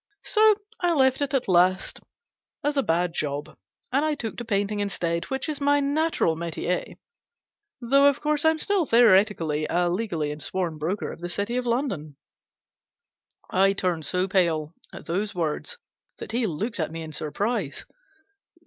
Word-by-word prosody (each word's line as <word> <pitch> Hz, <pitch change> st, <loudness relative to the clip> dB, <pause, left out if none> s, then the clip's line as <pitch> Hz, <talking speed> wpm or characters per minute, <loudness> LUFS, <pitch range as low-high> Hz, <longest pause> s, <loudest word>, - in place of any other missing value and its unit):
So 435 Hz, -1 st, +5 dB, 0.2 s
I 350 Hz, -1 st, +2 dB
left 265 Hz, -2 st, +3 dB
it 285 Hz, -1 st, 0 dB
at 265 Hz, -, 0 dB
last 185 Hz, +1 st, +2 dB, 0.6 s
as 290 Hz, 0 st, 0 dB
a 275 Hz, -, +3 dB
bad 175 Hz, -4 st, 0 dB
job, 145 Hz, -1 st, -3 dB, 0.4 s
and 295 Hz, +2 st, +1 dB
took 225 Hz, -2 st, -4 dB
to 240 Hz, -, -4 dB
painting 205 Hz, -1 st, -1 dB
instead, 170 Hz, -4 st, -2 dB
which 265 Hz, +2 st, -3 dB
is 300 Hz, -2 st, -3 dB
my 285 Hz, +1 st, +3 dB
natural 285 Hz, -, +1 dB
metier; 170 Hz, +2 st, -3 dB, 0.8 s
though, 275 Hz, +3 st, +4 dB
of 280 Hz, -, +2 dB
course, 300 Hz, -1 st, 0 dB
I'm 320 Hz, 0 st, +4 dB
still 375 Hz, -1 st, +1 dB
theoretically 190 Hz, -9 st, +4 dB
and 175 Hz, 0 st, +1 dB
legally 175 Hz, -8 st, -2 dB
a 150 Hz, -, -7 dB
sworn 170 Hz, -1 st, -2 dB
broker 180 Hz, +7 st, -2 dB
of -, -, -10 dB
the 175 Hz, +1 st, -5 dB
City 205 Hz, +6 st, -2 dB
of 250 Hz, -1 st, -1 dB
London." 195 Hz, -, -2 dB, 1.3 s
I 195 Hz, +1 st, +4 dB
turned 175 Hz, -5 st, -1 dB
so 185 Hz, +1 st, +1 dB
pale 170 Hz, -5 st, +1 dB, 0.2 s
at -, -, -10 dB
those 200 Hz, +4 st, -2 dB
words 170 Hz, -, -2 dB, 0.4 s
that -, -, -7 dB
he 235 Hz, 0 st, 0 dB
looked 205 Hz, +6 st, -3 dB
at 160 Hz, -1 st, -1 dB
me 165 Hz, 0 st, -6 dB
in 155 Hz, -, -8 dB
surprise. 185 Hz, -, -2 dB
200 Hz, 160 wpm, -25 LUFS, 170-265 Hz, 1.3 s, So